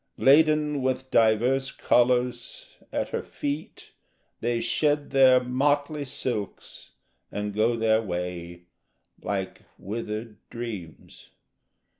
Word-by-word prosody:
Laden 150 0 +4
with 130 0 -2
divers 120 +4 +3
colours, 125 -1 +1 0.3
at - - -2
her - - -2
feet 145 +2 -6 0.5
They 120 0 0
shed 145 +5 0
their 130 -2 +6
motley 145 +3 0
silks 120 -6 -5 0.4
and 105 0 -3
go 110 +3 +2
their 110 -1 +2
way 90 -3 -5 0.6
Like 95 -2 -4 0.2
withered 105 +1 -5
dreams. 105 -9 -8
120 Hz, 95 wpm, -26 LUFS, 105-135 Hz, 0.6 s, their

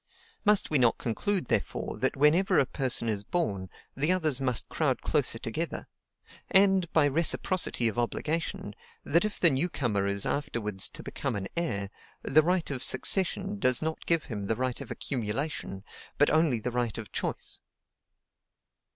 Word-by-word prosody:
Must 210 -5 +3
we 145 - +4
not 120 -2 +3
conclude, 185 - -1
therefore, - - -2
that - - +1
whenever 155 +7 +4
a - - +4
person 130 -3 0
is 105 -2 -1
born, 100 - -2 0.3
the 150 +6 +1
others 155 -7 0
must 125 -3 +1
crowd - - -1
closer - - +1
together; - - -3 0.6
and, 190 -3 +4
by 155 -2 +4
reciprocity 165 -3 +2
of 115 +2 -2
obligation, 155 +7 -2 0.3
that 170 +5 +2
if 215 - -4
the 170 - +6
new 140 +7 0
comer 105 - -1
is 100 0 +1
afterwards 110 -9 -1
to - - -9
become - - -4
an 100 -1 -4
heir, 105 -13 -1 0.3
the 155 +3 +4
right 175 -1 0
of 130 -3 -4
succession 195 +7 +1
does 130 -5 +2
not 160 0 -4
give 165 -2 +1
him 105 -6 -5
the 115 - +1
right 130 0 -2
of - - -8
accumulation, 120 -4 -4 0.3
but 145 - +4
only 155 -7 +2
the 125 +3 -3
right 120 -2 -2
of 110 -2 -8
choice? - - -4
135 Hz, 160 wpm, -28 LUFS, 115-170 Hz, 0.6 s, the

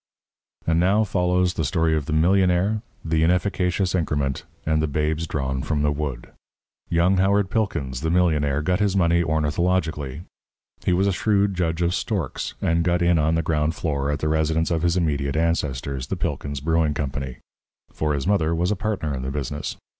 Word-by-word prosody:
And 80 0 +2
now 100 +5 +3
follows 90 -2 +1
the - - -2
Story 80 -3 +1
of 75 -3 -2
the - - -3
Millionaire, 90 +5 +3 0.2
the 80 0 +1
Inefficacious 90 +1 +1
Increment, 75 -6 -1 0.2
and 80 0 +2
the 80 - 0
Babes 75 +3 -1
Drawn 65 -3 -2
from 75 +1 -1
the 75 - +2
Wood. 70 -5 -4 0.6
Young 85 +3 +3
Howard 95 +1 +2
Pilkins, 70 - -1
the 80 - -1
millionaire, 75 -5 +2
got 90 +4 +1
his 100 -2 +1
money 85 -1 +3
ornithologically. 80 -2 0 0.6
He - - +1
was 90 +2 +2
a 100 - +2
shrewd 100 0 +1
judge 85 -2 -1
of 85 +1 +1
storks, 95 - -3
and 85 0 +2
got 85 0 +1
in 85 -1 +3
on 80 +2 +2
the 85 - 0
ground 75 0 0
floor 70 -3 -1
at 75 - 0
the 75 - -2
residence 80 +1 +1
of 80 -2 +1
his 85 +1 +1
immediate 70 -5 0
ancestors, 70 -5 -1
the - - -3
Pilkins 70 -2 -3
Brewing 80 -1 +1
Company. 70 -3 -4 0.5
For 75 -1 -1
his 70 - -3
mother 85 -5 +2
was 90 +4 0
a - - +1
partner 95 -8 -2
in 65 - -3
the 65 - -3
business. 75 +1 -4
80 Hz, 185 wpm, -23 LUFS, 75-90 Hz, 0.6 s, now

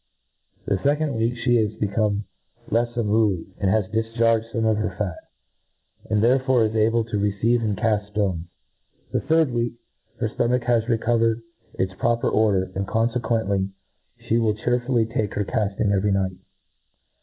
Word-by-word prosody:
The 100 - +1
fccond 145 +7 +1
week 115 +1 0
(he 120 -2 +4
is 105 -1 0
be 105 - -1
come 105 0 0 0.5
lefs 120 +1 0
unruly, 105 -5 +1
and 95 - +1
has 105 0 +2
difcharged 115 0 +1
fome 115 0 0
of 105 - 0
her 105 -1 0
fat; 100 -5 -4 0.8
and 105 0 +2
therefore 130 -1 +3
is 110 - -2
able 115 +1 +3
to 110 -2 -3
receive 105 +4 +1
and 105 -3 -1
eaft 105 -1 0
ftones* 95 -5 -1 0.7
The - - +1
third 160 -1 +2
week 120 0 -1 0.5
her - - 0
ftomach 125 +1 0
has 120 -2 +2
reco 115 0 +1
vered 115 0 +1 0.3
its 95 0 -1
proper 120 0 +1
order, 100 -4 +2
and 95 +1 -3
confcquently 115 -4 0 0.5
ihe 115 - 0
will 110 -2 +1
chearfiiUy 120 0 0
take 105 -4 -1
her 105 - 0
calling 100 0 0
every 100 +1 +1
night. 95 -1 0
110 Hz, 160 wpm, -23 LUFS, 105-120 Hz, 0.8 s, he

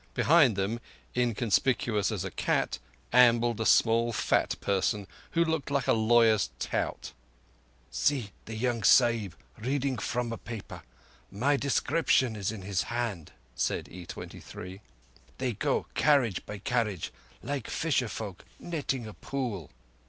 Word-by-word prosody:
Behind 150 -9 +5
them, 100 +4 -1 0.4
inconspicuous 115 -2 +1
as - - -3
a - - -4
cat, - - 0 0.3
ambled 120 -2 +5
a 110 - +1
small 115 +1 +4
fat 110 - +1
person 100 +1 0 0.3
who 170 0 +3
looked 160 -3 -1
like 140 -4 0
a - - +4
lawyer's 110 -1 +4
tout. - - -3 0.8
"See 130 -9 0
the 110 - -6
young 120 0 0
Sahib 115 -4 +4 0.2
reading 130 +1 -1
from 120 +2 -2
a 115 - -6
paper. 115 -2 -8 0.5
My 135 +8 +1
description 140 -3 +2
is 100 -1 -2
in 105 -4 -7
his 95 -1 0
hand," 115 -9 -3 0.2
said - - -1
E23. 90 +1 -9 0.6
"Thev 125 -5 -2
go - - +1
carriage 130 - +3
by 105 - -5
carriage, 105 -4 -1 0.3
like 140 -5 -3
fisher 150 -6 0
folk 100 -5 -6
netting 140 -7 -3
a 110 - -8
pool." 115 - -4
115 Hz, 130 wpm, -29 LUFS, 105-130 Hz, 0.8 s, Behind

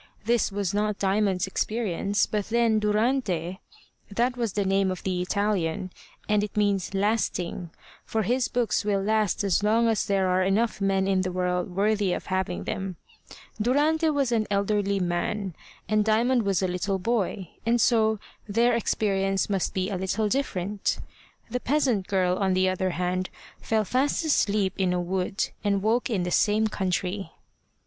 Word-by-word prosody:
This 235 -2 +2
was 200 -2 -2
not 210 0 0
Diamond's 195 -1 +1
experience, 200 -1 0
but 210 -2 -2
then 230 -1 +2
Durante 210 -5 0 0.5
that 240 +5 0
was 230 -5 -2
the 205 -1 0
name 195 0 +2
of 185 -1 -4
the 185 -2 -1
Italian, 185 -3 -1 0.4
and 210 -1 +2
it 210 - -6
means 200 -2 +1
Lasting, 195 -4 -1 0.3
for 220 -1 -1
his 245 +4 +1
books 240 -3 0
will 200 -2 0
last 215 -1 +1
as 195 -1 +2
long 225 +3 +3
as 225 -2 +2
there 195 -2 +2
are 185 0 +2
enough 200 +3 +1
men 195 -1 +1
in 190 -1 +2
the 185 0 -2
world 180 0 -1
worthy 205 -1 +2
of - - -4
having 180 - -1
them 190 - -4 0.7
Durante 300 +7 +2
was 280 -4 +1
an 220 -2 +1
elderly 200 0 +1
man, 180 +2 -2 0.3
and 215 0 +2
Diamond 225 +1 +2
was 195 -1 +1
a - - +2
little 185 +2 -1
boy, 195 -3 -1
and 235 +1 +2
so 220 -2 +3 0.3
their 235 +4 +3
experience 195 -4 0
must 195 -2 0
be 190 +1 -1
a 190 - -1
little 200 +3 0
different. 205 -5 -1 0.5
The 250 - -1
peasant 250 -8 +1
girl, 185 -2 +1
on 190 -2 +1
the 185 0 +3
other 185 0 0
hand, 180 +1 -2 0.3
fell 220 -1 0
fast 270 - 0
asleep 205 - +2
in 185 -2 +2
a 180 - 0
wood, 185 +2 -1
and 200 -2 +1
woke 235 +4 +1
in 200 -6 0
the 180 - -2
same 215 +3 +3
country. 190 0 -2
200 Hz, 165 wpm, -26 LUFS, 185-220 Hz, 0.7 s, long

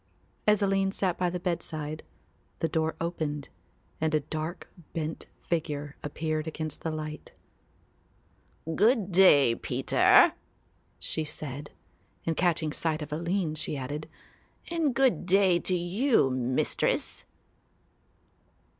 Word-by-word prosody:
As 210 -1 +4
Aline 195 0 +2
sat 190 -3 0
by 180 -1 +2
the 180 +1 -3
bedside 155 -3 -3 0.6
the 165 - 0
door 160 0 0
opened 155 -4 -3 0.5
and 155 -1 +2
a - - +4
dark 155 +4 -5 0.3
bent 160 -1 -4
figure 150 -3 -3
appeared 155 +1 -2
against 155 -1 -5
the 165 - -2
light. 155 -1 -6 1.4
"Good 215 -1 +3
day, 150 -9 +6
Peter," - - +4 0.6
she 160 - -2
said, 150 -1 -6 0.6
and 165 - 0
catching 160 -3 +1
sight 155 -2 -1
of 150 - -7
Aline 170 +1 -1
she 155 -1 -3
added, 145 +4 -5 0.6
"and 320 -7 +1
good 265 -8 +2
day 190 -2 +4
to 185 - -1
you, 180 - +2
Mistress." 130 0 -1
160 Hz, 115 wpm, -28 LUFS, 150-185 Hz, 1.4 s, day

